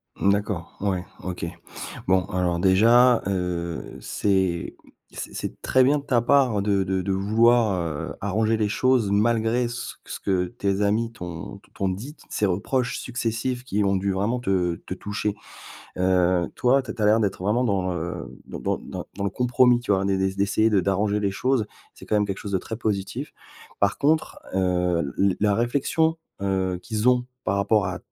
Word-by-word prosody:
Mmh, 100 - +2
d'accord 100 -4 -2
ouais. 95 -3 -1 0.2
OK. 90 -2 -4 0.6
Bon 95 -1 +3
alors 90 -3 -1
déjà, 115 +7 +5
heu, 90 -3 -3
c'est 95 -4 0 0.3
c'est - - -7
c'est - - -5
très 130 - +4
bien 145 +3 +3
de - - -11
ta 120 -4 +2
part 125 -5 +3
de 100 -1 +1
de 95 0 -1
de 95 +1 -2
vouloir, 110 +3 +3
heu, 80 -3 -4
arranger 110 +3 +1
les 105 -1 +1
choses 125 -1 +2
malgré 115 +3 +2
ce 120 - -6
ce - - -6
que 95 -2 0
tes 100 -3 -1
amis 110 +3 +1
t'ont 85 -7 -7
t - - -26
t'ont 95 - -1
dit, 115 +11 -6
ces 105 - 0
reproches 125 +7 0
successifs 120 +1 -2
qui 105 -4 0
ont 100 - +2
dû 95 +1 0
vraiment 105 +6 0
te 95 -7 0
te - - -4
toucher, 100 +2 -3 0.7
heu, 90 -1 +3
toi, 130 +2 +3
tu 130 - -8
as - - -4
tu 110 - -4
as - - +3
l'air 110 +2 +5
d'être 100 -3 -1
vraiment 110 +6 +1
dans, 95 -5 0
heu, 85 +1 -4 0.2
dans - - -7
dans - - -1
dans - - -7
dans 100 +1 -4
le 100 - 0
compromis 125 +1 +3
tu 120 - -6
vois? 95 0 +1
D'é 95 -1 +1
d'é 95 0 0
d'essayer 100 +3 +2
de 100 -3 +4
d'arranger 100 +2 +1
les 100 -1 +1
choses, 125 +1 0 0.3
c'est - - -13
quand 105 - +1
même 105 - +2
quelque 100 -1 -4
chose 100 - -6
de 95 - +2
très 110 - -6
positif. 110 +6 -3 0.5
Par 100 -1 +2
contre 155 +2 +1 0.2
heu, 90 -5 +1
l 100 -1 +3
la 105 -1 +3
réflexion, 145 +7 +1 0.2
heu, 95 -2 0
qu'ils 110 0 -2
ont 125 -1 +1 0.2
par 100 - 0
rapport 100 0 +2
à 95 - -3
100 Hz, 190 wpm, -24 LUFS, 95-120 Hz, 0.7 s, déjà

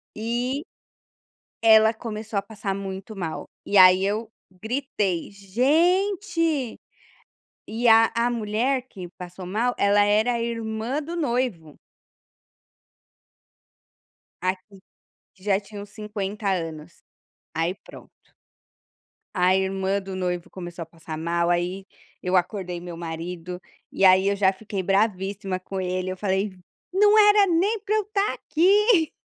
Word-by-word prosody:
E, 245 +6 -2 1.0
ela 220 0 +6
começou 220 -2 -5
a - - +2
passar 200 -1 -5
muito 195 +2 -6
mal, 165 -4 -5 0.2
e 205 - +1
aí 185 +1 +7
eu 215 +2 -2 0.3
gritei: 220 - -2
"Gente" 325 - +1 0.9
e 230 +2 0
a 225 0 +7
a 235 +1 +1
mulher 235 +4 0
que 180 -2 -9
passou 180 +1 -8
mal, 225 +7 0
ela 205 +1 +4
era 215 +4 +2
a 235 - -1
irmã 230 +4 -3
do 335 +4 -6
noivo. 240 - -2 2.7
A 185 0 +2 0.8
que 185 - -24
já 195 -2 +4
tinha 205 -1 -9
uns 205 - -12
50 210 -1 -4 0.2
anos, 155 +1 -11 0.6
aí 165 +3 0
pronto. - - -15 1.1
A 185 0 +3
irmã 190 +1 0
do 190 -1 -7
noivo 180 -2 -3
começou 175 -2 -7
a - - -12
passar 165 -1 -9
mal, 170 +1 0
aí 180 +2 -1 0.4
eu 180 +1 0
acordei 180 -1 -1
meu 175 -1 -8
marido, 170 +2 -6 0.3
e 195 - -2
aí 190 +1 +6
eu 200 - +2
já 195 -1 +3
fiquei 195 0 -5
"bravíssima" 195 -1 0
com 190 +1 -6
ele, 185 0 -2
eu 185 - -4
falei: 195 0 0 0.4
"Não 415 +3 +5
era 415 -1 +7
nem 390 +5 +1
para 425 0 -1
eu 430 - +3
estar 405 0 0
aqui, 380 +1 +3
205 Hz, 130 wpm, -24 LUFS, 185-245 Hz, 2.7 s, aí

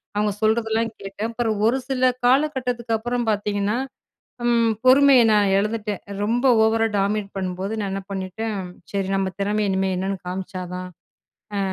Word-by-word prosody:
அவங்க 210 0 +1
சொல்றதெல்லாம் 220 +1 +1
கேட்டேன். 200 +3 -5
அப்புறம் 230 -2 -1
ஒரு 255 +3 +2
சில 255 -1 +1 0.2
காலகட்டத்துக்கு 250 -4 +1
அப்புறம் 240 +2 -2
பார்த்தீங்கன்னா, 205 +1 -1 0.7
ம் 230 -1 +3
பொறுமைய 270 +1 +7
நான் 205 -2 +3
இழந்துட்டேன். 210 -1 -2 0.2
ரொம்ப 240 +5 0 0.2
ஓவரா 225 0 +3
டாமினேட் 200 0 -1
பண்ணும்போது 190 +2 -3
நான் 195 - -3
என்ன 195 -1 -4
பண்ணிட்டேன். 195 +3 -3 0.4
சரி, 195 -1 -1
நம்ம 190 -1 0
திறமைய 205 +1 0
இனிமே 190 0 0
என்னன்னு 190 +1 -2
காமிச்சா 185 0 -5
தான் 180 0 -6 0.7
அ, - - 0
215 Hz, 145 wpm, -23 LUFS, 195-235 Hz, 0.7 s, பொறுமைய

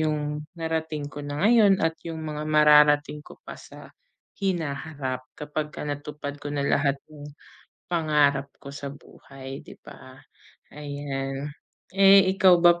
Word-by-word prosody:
'yong 150 -1 -2
narating 160 -2 -3
ko 145 - -7
na 145 +5 -3
ngayon 210 -5 +5
at 165 0 0
'yong 165 -1 -6
mga 150 -1 -5
mararating 150 -1 +5
ko - - -14
pa - - -9
sa - - -13 0.5
hinaharap 145 -7 -3
kapagka 150 0 -5
natupad 145 0 -6
ko 145 - -6
na 145 - -2
lahat 140 0 +1
nang 150 -1 -11 0.6
pangarap 150 -5 +2
ko 140 - -9
sa 140 0 -6
buhay, 135 -1 -11
'di - - -12
ba? 130 0 -13 0.6
Ayan. 145 -1 -5 0.4
Eh, 195 -1 +6
ikaw 185 -2 +6
ba, 175 0 +5
150 Hz, 135 wpm, -25 LUFS, 145-160 Hz, 0.6 s, Eh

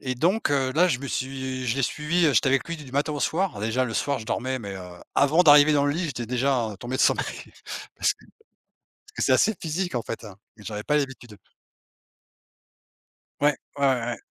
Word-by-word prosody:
et 130 -2 -3
donc, 180 - +1
heu, 135 -2 +1
là 175 +5 +4
je 140 -8 0
me 140 - -6
suis 130 -1 -3
je 120 +2 0
l'ai 135 - 0
suivi, 160 +7 +1
heu, 150 - +3
j'étais 125 +2 +3
avec 135 -2 +2
lui 170 - -3
du 145 -5 -12
matin 145 +2 0
au 145 - -4
soir. 170 - 0
Déjà 115 +4 0
le 115 -3 -4
soir 140 +3 0
je 110 - -9
dormais, 130 +2 -2
mais, 100 -5 -7
heu, - - -8 0.3
avant 145 +5 +4
d'arriver 150 -2 +7
dans 145 -1 +3
le 145 - +2
lit 170 +3 -2
j'étais 125 -6 -4
déjà, 125 -1 0
heu, - - -10
tombé 120 +6 -4
de - - -2
sommeil, - - +3 0.7
parce - - +2
que - - -22 0.7
parce - - -24
que - - -4
c'est - - +4
assez 220 - +3
physique 175 0 -2
en 120 - 0
fait, 115 +1 -6
hein, 105 -4 -10 0.2
mais 105 - -15
j'avais 105 +1 -5
pas 150 - +1
l'habitude. 130 -6 -5 2.0
Ouais, 145 0 +4 0.2
ouais, 140 - +1
ouais, 130 -2 +2
ouais. 120 -1 -2
135 Hz, 225 wpm, -25 LUFS, 120-150 Hz, 2.0 s, d'arriver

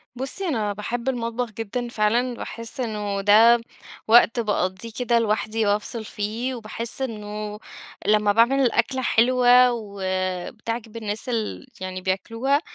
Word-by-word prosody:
بُصّي، 270 +10 -3
أنا 215 -9 -1
باحِبّ 235 +5 -3
المطبخ 235 -1 -2
جدًا 225 +3 -4
فعلًا، 235 +3 +1
باحسّ 230 +4 -7
إنه 210 -4 -2
ده 225 +4 +6 0.5
وقت 235 +1 +6
باقضّيه 205 -1 -1
كده 235 -1 +2
لوحدي 220 0 0
وافصل 210 +2 -1
فيه، 225 +6 -3
وباحسّ 230 +2 -6
إنه 210 -3 -5 0.5
لمَّا 210 -1 +4
باعمل 235 +5 +4
الأكلة 260 0 +1
حلوة 250 +1 +5
وبتعجب 200 +2 -4
الناس 215 +2 -4
ال 230 +3 -3
يعني 185 0 -5
بياكلوها، 230 - 0
225 Hz, 120 wpm, -23 LUFS, 210-245 Hz, 0.5 s, ده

